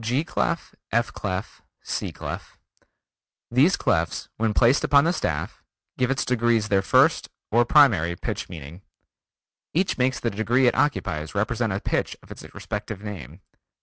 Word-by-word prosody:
G 125 +7 0
Clef, - - -2 0.2
F 120 +1 +1
Clef, 95 +1 -5 0.2
C - - -3
Clef: - - -7 0.9
These 140 +10 +4
clefs 85 -3 -1
when 110 0 +1
placed 120 +6 +3
upon 140 -1 +5
the 170 +2 +2
staff, - - -3 0.3
give 125 -1 0
its 135 0 0
degrees 120 -3 +1
their 100 -1 +3
first, 95 - +3 0.2
or 120 +2 +4
primary 100 - +4
pitch - - -5
meaning. 80 +1 -9 0.9
Each 185 -4 +1
makes 125 0 +1
the 115 - -1
degree 115 +5 +2
it 120 - +4
occupies 100 - -1
represent 110 +2 0
a 95 - -1
pitch - - -2
of - - -16
its - - -9
respective 105 -2 -6
name. 90 - -8
115 Hz, 150 wpm, -24 LUFS, 95-125 Hz, 0.9 s, upon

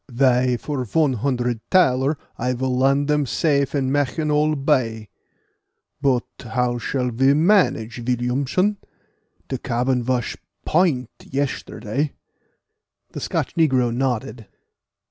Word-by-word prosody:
"Vy, 125 0 +2
for 140 0 -3
von 145 +4 +1
hondred 125 -1 -1
thaler 140 -5 +3 0.2
I 125 +2 -1
will 130 +1 -1
land 135 +2 +2
dem 150 -2 +1
safe 140 0 +1
in 135 -2 0
Mancheoneal 150 +2 +1
Bay; 125 -7 0 0.9
but 130 -4 +2
how 120 +1 -1
shall 125 +1 -2
ve 135 +4 +3
manage, 150 - +2
Villiamson? 130 - 0 0.7
De 130 - -3
cabin 125 0 0
vas 125 -1 -1 0.3
point 155 -8 +1
yesterday." 140 -1 -3 1.0
The - - -6
Scotch - - -2
negro 130 -7 +2
nodded. 125 -3 -2
130 Hz, 110 wpm, -22 LUFS, 125-145 Hz, 1.0 s, thaler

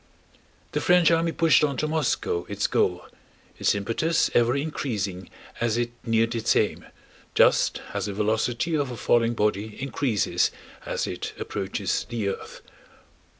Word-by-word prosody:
The - - -1
French 175 -2 +5
army 165 0 +2
pushed 165 -1 +4
on 140 -3 +1
to 155 - 0
Moscow, 150 - -1
its 100 0 -1
goal, 90 -1 +1 0.5
its - - +2
impetus 115 +11 0
ever 120 +1 +3
increasing 105 - -3 0.3
as 115 -1 +1
it 120 0 -1
neared 115 0 +1
its 115 -2 +1
aim, - - 0 0.5
just - - +3
as - - -2
the 100 - -3
velocity 110 - 0
of 145 -3 0
a 120 - -6
falling 120 0 +2
body 105 0 -1
increases 130 -4 0 0.4
as - - -1
it - - -5
approaches - - -2
the 115 -4 -1
earth. 95 - -7
115 Hz, 145 wpm, -25 LUFS, 105-145 Hz, 0.5 s, French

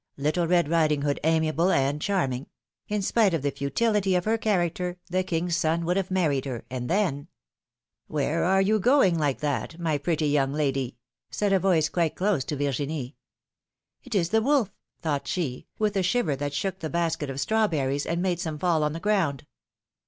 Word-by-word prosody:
Little 155 +5 0
Red 175 -2 +3
Riding 155 -3 +2
Hood 145 -1 0
amiable 160 +2 +2
and 140 -2 +1
charming; 140 -10 -1 0.4
in 210 -1 -1
spite 200 -3 +3
of 150 - -3
the 140 - +1
futility 195 +7 +1
of 180 - 0
her 220 +1 +2
character 180 -4 -1
the 185 +1 +2
king's 175 -1 -1
son 165 +1 0
would 175 +2 +1
have 190 -1 -1
married 155 -8 +1
her, 125 -4 -5
and 125 -1 -4
then 170 -8 0 0.4
— - - -65
Where 150 +2 0
are 190 +2 +3
you 215 +2 +2
going 235 -5 +4
like 145 -2 0
that, 150 +3 -2
my 160 -4 0
pretty 160 +1 0
young 140 -2 +1
lady?" 135 -4 -1 0.3
said 205 -1 0
a 190 - +4
voice, 175 -5 +3
quite 170 -3 0
close 190 -7 +1
to 150 - -3
Virginie. 140 -1 -2 0.9
^^It 255 -4 -6
is 170 -4 +2
the 220 +2 +3
wolf!" 260 -5 +2 0.3
thought 145 -4 -1
she, 145 -9 -3
with 210 -1 0
a 195 - +2
shiver 180 - +1
that 145 +1 -4
shook 190 +5 -2
the 160 - -4
basket 165 -4 -1
of 135 0 -4
strawberries, 145 -7 0
and 170 +2 -1
made 180 -2 0
some 160 -3 -3
fall 165 -1 +1
on 150 0 0
the 165 - -5
ground. 165 -9 0
165 Hz, 190 wpm, -26 LUFS, 145-190 Hz, 0.9 s, going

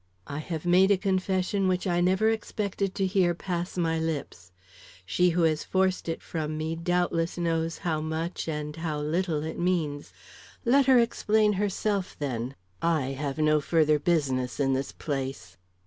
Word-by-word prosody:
"I 145 - -5
have 160 +1 -5
made 185 +2 +5
a 200 - +5
confession 190 0 0
which 185 +1 0
I 175 -2 +1
never 190 +4 +3
expected 200 -3 -2
to 195 - +1
hear 185 -2 +2
pass 175 0 -4
my 165 -2 +1
lips. 145 - -4 0.5
She 180 - +3
who 170 0 +1
has 155 -1 +2
forced 185 -2 0
it 165 - -4
from 155 -2 -3
me 160 +1 -2
doubtless 170 0 0
knows 165 -1 -1
how 160 -5 -1
much 160 +3 -3
and 150 -1 -4
how 160 -2 -2
little 155 +1 -1
it 160 0 -5
means. 165 -5 -1 0.5
Let 270 +3 +4
her 260 -1 +7
explain 220 -2 +3
herself, 200 0 -1
then. 130 -2 -3 0.3
I 155 -6 +1
have 135 +1 -3
no 155 -1 +3
further 155 -1 +3
business 140 -6 0
in 135 -1 +2
this 135 +1 -2
place." 135 - -5
165 Hz, 165 wpm, -27 LUFS, 150-185 Hz, 0.5 s, her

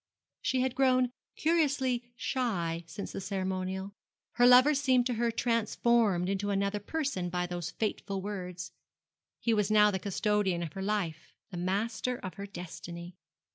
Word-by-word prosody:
She 255 0 +1
had 260 -1 0
grown 255 -1 +3 0.2
curiously 270 -7 +1
shy 175 -11 -1
since 200 - -6
the - - -5
ceremonial. 190 0 -3 0.4
Her 245 0 +5
lover 255 +4 +8
seemed 260 -3 +3
to 250 - 0
her 235 +1 +1
transformed 230 -4 +2
into 200 +1 -1
another 200 +1 0
person 235 - -2
by 180 0 -1
those 175 -1 -4
fateful 200 0 -2
words. 180 -3 -5 0.7
He 230 - +1
was 210 -2 +2
now 210 -1 +6
the 190 - -1
custodian 200 -2 0
of 160 -3 -6
her 195 - -5
life, 190 -6 -2 0.2
the 180 - -5
master 215 +7 -1
of 185 -5 -7
her 200 0 -7
destiny. 175 -1 -8
205 Hz, 150 wpm, -30 LUFS, 185-245 Hz, 0.7 s, lover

